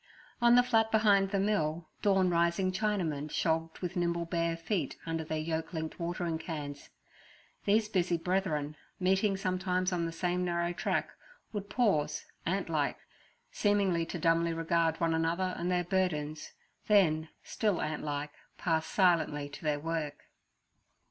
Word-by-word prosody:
On 240 0 +6
the 245 - +7
flat 225 -3 +3
behind 205 -3 +4
the 200 - 0
mill, 165 -5 0
dawn 195 -3 +3
rising 170 +2 +2
Chinamen 180 -8 -1
shogged 160 0 0
with 180 +1 -3
nimble 170 -1 0
bare 170 -1 -1
feet 165 -2 -2
under 165 -1 -2
their 155 0 -3
yoke 160 +2 -3
linked 160 +1 -4
watering 170 -1 -2
cans. 145 -4 -6 0.8
These 210 +2 +3
busy 180 -4 +1
brethren, 160 -4 -1 0.2
meeting 190 +2 +2
sometimes 185 0 0
on 170 -2 0
the - - -4
same 180 +2 -1
narrow 170 0 0
track, - - -1 0.4
would 205 -1 -4
pause, 200 -12 +1 0.2
ant - - 0
like, - - 0 0.5
seemingly 195 -5 +2
to - - -4
dumbly 165 +1 +2
regard 165 0 +1
one 165 -1 +2
another 170 +3 0
and 175 +1 -2
their 180 -1 +1
burdens, 160 -5 -1 0.3
then, 160 -7 +4
still 210 -7 0
ant 155 0 -2
like, 145 0 -3 0.3
pass 160 -2 0
silently 165 -6 +2
to 145 - -10
their 150 -1 0
work. 155 -2 -3
170 Hz, 150 wpm, -31 LUFS, 160-190 Hz, 0.8 s, the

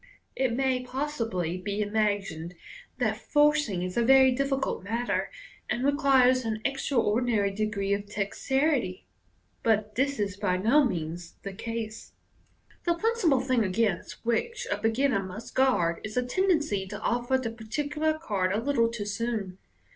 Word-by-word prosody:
It 260 -3 +1
may 260 -1 +1
possibly 230 - -2
be 200 +2 -3
imagined 205 -5 -1 0.4
that - - 0
forcing 295 -11 +2
is 180 0 -4
a 235 - +2
very 265 +2 +6
difficult 270 -4 -1
matter, 230 +4 -1 0.4
and 245 - -1
requires 265 -3 +4
an 220 -1 -2
extraordinary 235 -6 +1
degree 200 -1 -1
of 200 0 -2
dexterity; 225 +1 -1 0.6
but 215 -1 +1
this 275 +3 0
is 200 -1 -2
by 190 -3 0
no 235 +11 +4
means 170 - -3
the 195 - -5
case. 225 +1 -6 0.7
The 345 -1 +2
principal 350 - +2
thing 255 -3 +2
against 195 0 -1
which 470 - -1
a - - +1
beginner 225 0 +1
must 190 +4 -8
guard, 210 -11 +2
is 215 +2 -6
a 250 - +3
ten 375 +10 0
dency 210 - +1
to 210 - -6
offer 240 +3 +1
the 245 -3 -3
particular 290 +8 -2
card 200 - -1
a 205 - +1
little 235 -1 +2
loo 230 -3 -4
soon. 205 -3 -3
230 Hz, 145 wpm, -28 LUFS, 200-270 Hz, 0.7 s, very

